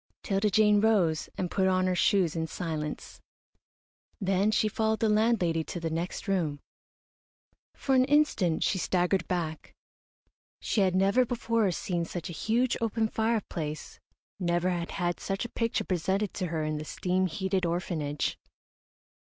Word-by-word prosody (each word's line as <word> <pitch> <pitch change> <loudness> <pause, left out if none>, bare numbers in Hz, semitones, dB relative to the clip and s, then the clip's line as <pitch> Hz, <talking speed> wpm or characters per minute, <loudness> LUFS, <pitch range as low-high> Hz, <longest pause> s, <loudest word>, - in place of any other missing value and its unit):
'Tilda 200 +1 +1
Jane 210 0 +4
rose 190 -8 +2
and 180 -2 -2
put 190 -1 +2
on 185 0 +2
her 185 - +1
shoes 180 -2 +2
in 160 0 -1
silence. 155 -3 -5 1.0
Then 195 0 +2
she 215 0 +2
followed 220 +1 0
the 225 - +2
landlady 210 -7 +2
to 175 - -5
the 165 -1 -3
next 170 +6 -4
room. 165 -7 0 1.2
For 270 - -1
an 255 -1 +5
instant 270 - +2
she 190 - +1
staggered 180 +1 +1
back. 160 -4 -3 0.8
She 215 - 0
had 185 -2 +2
never 195 +7 +4
before 230 -3 0
seen 175 -1 -2
such 175 0 -6
a 160 - -7
huge, 235 +3 +1
open 225 -1 0
fireplace, 205 -10 -2 0.4
never 175 0 +1
had 170 -1 -3
had 175 -2 -2
such 195 +4 -3
a - - -5
picture 230 0 -1
presented 190 +3 -1
to 185 - -2
her 160 -1 -2
in 155 0 -2
the - - -5
steam 185 +3 0
heated 190 +1 -1
orphanage. 165 -4 -2
185 Hz, 155 wpm, -28 LUFS, 170-215 Hz, 1.2 s, an